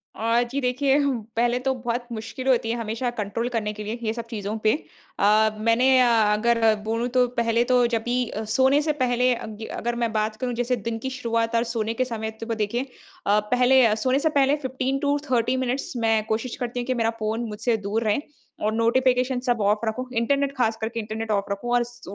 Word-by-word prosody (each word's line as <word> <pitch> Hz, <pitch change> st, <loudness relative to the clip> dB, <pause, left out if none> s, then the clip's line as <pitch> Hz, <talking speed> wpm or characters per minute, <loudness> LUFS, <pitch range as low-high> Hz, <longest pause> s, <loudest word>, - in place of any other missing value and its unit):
अ, 230 Hz, +2 st, +2 dB
जी 275 Hz, -, -1 dB
देखिए 265 Hz, +2 st, +2 dB
हु 280 Hz, -1 st, +2 dB, 0.2 s
पहले 240 Hz, +1 st, +2 dB
तो 265 Hz, -, +2 dB
बहुत 240 Hz, -1 st, -3 dB
मुश्किल 230 Hz, +3 st, -6 dB
होती 245 Hz, -3 st, +2 dB
है 230 Hz, -, 0 dB
हमेशा 230 Hz, +2 st, -2 dB
कंट्रोल 210 Hz, +3 st, -2 dB
करने 215 Hz, -3 st, -2 dB
के 210 Hz, 0 st, -7 dB
लिए 215 Hz, +3 st, -4 dB
ये 220 Hz, -1 st, 0 dB
सब 235 Hz, 0 st, -6 dB
चीज़ों 210 Hz, -1 st, -4 dB
पे। 215 Hz, -, +4 dB, 0.5 s
अ, 215 Hz, +2 st, +4 dB
मैंने 230 Hz, +3 st, +3 dB
अ, 250 Hz, -, +5 dB, 0.3 s
अगर 225 Hz, 0 st, +3 dB
बोलूँ 230 Hz, +2 st, -1 dB
तो 250 Hz, 0 st, +5 dB
पहले 230 Hz, 0 st, +2 dB
तो 250 Hz, -1 st, +4 dB
जब 225 Hz, -1 st, 0 dB
भी 240 Hz, +1 st, -1 dB
अ, 215 Hz, -, -4 dB
सोने 265 Hz, +2 st, +4 dB
से 305 Hz, 0 st, 0 dB
पहले 250 Hz, 0 st, +2 dB
अग 220 Hz, -1 st, -7 dB
अगर 240 Hz, 0 st, -2 dB
मैं 230 Hz, -, 0 dB
बात 215 Hz, 0 st, 0 dB
करूँ 250 Hz, -1 st, -1 dB
जैसे 245 Hz, +1 st, 0 dB
दिन 230 Hz, 0 st, -4 dB
की -, -, 0 dB
शुरुआत 230 Hz, -3 st, -1 dB
और 230 Hz, -, +3 dB
सोने 230 Hz, -2 st, -2 dB
के 255 Hz, +3 st, 0 dB
समय 220 Hz, -3 st, -4 dB
तो -, -, -3 dB
को 230 Hz, -, -1 dB
देखिए 220 Hz, +3 st, -1 dB, 0.4 s
अ, 205 Hz, +1 st, +4 dB
पहले 250 Hz, +4 st, +4 dB
अ, 215 Hz, -, +3 dB
सोने 255 Hz, +5 st, +1 dB
से 315 Hz, -, +2 dB
पहले 275 Hz, +1 st, +4 dB
15 260 Hz, +1 st, -1 dB
टू 285 Hz, 0 st, +1 dB
30 245 Hz, +1 st, +2 dB
मिनिट्स 255 Hz, +2 st, -2 dB
मैं 225 Hz, -2 st, +2 dB
कोशिश 225 Hz, +3 st, -2 dB
करती 245 Hz, 0 st, -4 dB
हूँ 240 Hz, -, -3 dB
कि 260 Hz, -, +1 dB
मेरा 230 Hz, -2 st, +1 dB
फ़ोन 220 Hz, +2 st, -1 dB
मुझसे 225 Hz, +2 st, 0 dB
दूर 220 Hz, +3 st, 0 dB
रहे 215 Hz, +2 st, +1 dB, 0.4 s
और 215 Hz, +1 st, 0 dB
नोटिफिकेशन 250 Hz, +2 st, +2 dB
सब 245 Hz, -3 st, 0 dB
ऑफ 205 Hz, +1 st, +2 dB
रखूँ। 220 Hz, +3 st, -2 dB
इंटरनेट, 275 Hz, +4 st, +1 dB
खास 225 Hz, -3 st, +1 dB
करके 225 Hz, +1 st, -3 dB
इंटरनेट 220 Hz, 0 st, -4 dB
ऑफ 200 Hz, -1 st, +1 dB
रखूँ। 220 Hz, +5 st, -3 dB
और 245 Hz, 0 st, +4 dB
स 240 Hz, 0 st, -13 dB
235 Hz, 220 wpm, -24 LUFS, 220-250 Hz, 0.5 s, अ